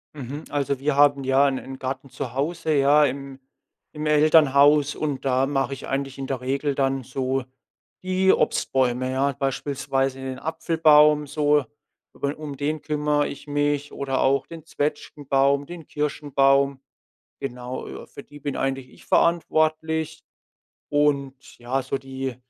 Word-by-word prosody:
Mhm. 140 Hz, +2 st, -7 dB
Also 140 Hz, -2 st, -1 dB
wir 140 Hz, +1 st, 0 dB
haben, 140 Hz, -1 st, +4 dB
ja, 135 Hz, +1 st, +4 dB
'n 135 Hz, -1 st, -1 dB
'n 135 Hz, 0 st, -8 dB
Garten 130 Hz, +1 st, -5 dB
zu 125 Hz, -3 st, -6 dB
Hause, 155 Hz, +4 st, -1 dB
ja, 145 Hz, +1 st, +5 dB
im 135 Hz, 0 st, -5 dB, 0.5 s
im 150 Hz, 0 st, -5 dB
Elternhaus 150 Hz, -1 st, +5 dB
und 145 Hz, -3 st, -3 dB
da 130 Hz, 0 st, +2 dB
mache 135 Hz, -1 st, -1 dB
ich 135 Hz, -, -8 dB
eigentlich 135 Hz, 0 st, -3 dB
in 135 Hz, -, -4 dB
der 135 Hz, -2 st, -2 dB
Regel 135 Hz, +3 st, -1 dB
dann 135 Hz, -1 st, 0 dB
so 130 Hz, +1 st, -2 dB, 0.6 s
die 185 Hz, +1 st, +3 dB
Obstbäume, 130 Hz, -1 st, 0 dB
ja. 135 Hz, +2 st, +1 dB
Beispielsweise 135 Hz, 0 st, -2 dB
den 130 Hz, -1 st, -5 dB
Apfelbaum 155 Hz, -2 st, +3 dB
so, 145 Hz, -1 st, +2 dB, 0.5 s
über 140 Hz, +1 st, -3 dB
um 150 Hz, -2 st, -7 dB
den 150 Hz, +2 st, -2 dB
kümmere 150 Hz, -1 st, 0 dB
ich 140 Hz, -, -9 dB
mich 145 Hz, 0 st, -1 dB
oder 135 Hz, -1 st, -2 dB
auch 135 Hz, +1 st, +2 dB
den 165 Hz, -2 st, -10 dB
Zwetschgenbaum, 140 Hz, -2 st, 0 dB
den 170 Hz, -2 st, -10 dB
Kirschenbaum. 140 Hz, -2 st, +1 dB, 0.6 s
Genau, 125 Hz, -1 st, -5 dB
äh, -, -, -9 dB
für 140 Hz, -, -11 dB
die 145 Hz, -, -14 dB
bin 145 Hz, -1 st, -4 dB
eigentlich 135 Hz, -1 st, -2 dB
ich -, -, -18 dB
verantwortlich. 160 Hz, -1 st, +1 dB, 0.7 s
Und 140 Hz, -2 st, -1 dB
ja, 125 Hz, +3 st, -2 dB
so 135 Hz, +1 st, -3 dB
die 135 Hz, -2 st, -5 dB
140 Hz, 145 wpm, -24 LUFS, 135-150 Hz, 0.7 s, ja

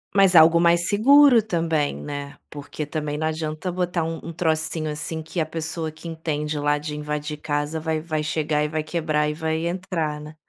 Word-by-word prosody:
Mas 195 Hz, -2 st, +5 dB
algo 165 Hz, +1 st, +7 dB
mais 170 Hz, +1 st, +3 dB
seguro 255 Hz, +3 st, +6 dB
também, 165 Hz, -7 st, 0 dB
né. 145 Hz, -1 st, -6 dB
Porque 145 Hz, +1 st, -6 dB
também 150 Hz, -1 st, -3 dB
não 155 Hz, +1 st, -1 dB
adianta 155 Hz, +3 st, -3 dB
botar 175 Hz, -2 st, -1 dB
um 165 Hz, 0 st, -4 dB
um 170 Hz, -, -7 dB
trocinho 160 Hz, -1 st, -1 dB
assim 160 Hz, +2 st, -4 dB
que 160 Hz, +2 st, -5 dB
a 155 Hz, -, +1 dB
pessoa 160 Hz, 0 st, -4 dB
que 155 Hz, +2 st, -11 dB
entende 155 Hz, -2 st, -3 dB
lá 145 Hz, 0 st, +2 dB
de 150 Hz, 0 st, -5 dB
invadir 150 Hz, 0 st, -4 dB
casa 150 Hz, +1 st, -2 dB
vai 160 Hz, 0 st, -1 dB
vai 155 Hz, -2 st, -2 dB
chegar 150 Hz, -1 st, 0 dB
e -, -, 0 dB
vai 155 Hz, 0 st, -2 dB
quebrar 155 Hz, -2 st, 0 dB
e -, -, -2 dB
vai 160 Hz, +1 st, -2 dB
entrar, 170 Hz, -4 st, -2 dB
né? 150 Hz, +1 st, -10 dB
160 Hz, 195 wpm, -23 LUFS, 150-170 Hz, -, algo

